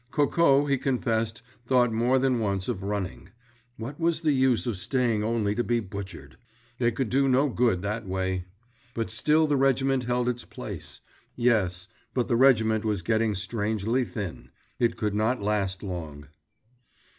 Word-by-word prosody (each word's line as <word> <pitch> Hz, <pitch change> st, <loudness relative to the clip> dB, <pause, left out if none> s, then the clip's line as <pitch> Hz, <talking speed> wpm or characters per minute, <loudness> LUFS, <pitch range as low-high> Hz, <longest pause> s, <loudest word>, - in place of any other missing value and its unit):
Coco, 145 Hz, 0 st, +3 dB
he 140 Hz, -2 st, +1 dB
confessed, 115 Hz, -3 st, -1 dB, 0.2 s
thought 125 Hz, -3 st, +3 dB
more 120 Hz, +4 st, +2 dB
than 130 Hz, -2 st, +2 dB
once 100 Hz, -3 st, -1 dB
of 95 Hz, -, -3 dB
running. 100 Hz, -2 st, -4 dB, 0.5 s
What 135 Hz, +7 st, -7 dB
was 165 Hz, -1 st, +1 dB
the 155 Hz, -2 st, +2 dB
use 130 Hz, -3 st, +2 dB
of 120 Hz, -4 st, -1 dB
staying 115 Hz, +1 st, 0 dB
only 110 Hz, -2 st, 0 dB
to 120 Hz, +3 st, -1 dB
be 120 Hz, 0 st, +1 dB
butchered? 100 Hz, -4 st, -8 dB, 0.4 s
They 120 Hz, -1 st, +2 dB
could 120 Hz, 0 st, -2 dB
do 135 Hz, +1 st, +3 dB
no 135 Hz, +3 st, +3 dB
good 115 Hz, -7 st, +1 dB
that 105 Hz, +1 st, -3 dB
way. 95 Hz, -1 st, -2 dB, 0.5 s
But 115 Hz, -2 st, -2 dB
still 150 Hz, +8 st, +3 dB
the 145 Hz, -2 st, +1 dB
regiment 135 Hz, -1 st, +2 dB
held 125 Hz, 0 st, 0 dB
its 125 Hz, 0 st, -1 dB
place; -, -, -8 dB, 0.3 s
yes, 95 Hz, -7 st, +1 dB, 0.3 s
but 125 Hz, -2 st, +1 dB
the 120 Hz, -, +1 dB
regiment 110 Hz, -4 st, +4 dB
was 105 Hz, -5 st, -1 dB
getting 110 Hz, +1 st, +1 dB
strangely 110 Hz, +4 st, -1 dB
thin. 100 Hz, -4 st, -6 dB, 0.3 s
It 120 Hz, -1 st, +1 dB
could 105 Hz, -2 st, -1 dB
not 110 Hz, +5 st, +1 dB
last 100 Hz, -2 st, -1 dB
long. 80 Hz, -7 st, -6 dB
115 Hz, 160 wpm, -27 LUFS, 100-130 Hz, 0.5 s, regiment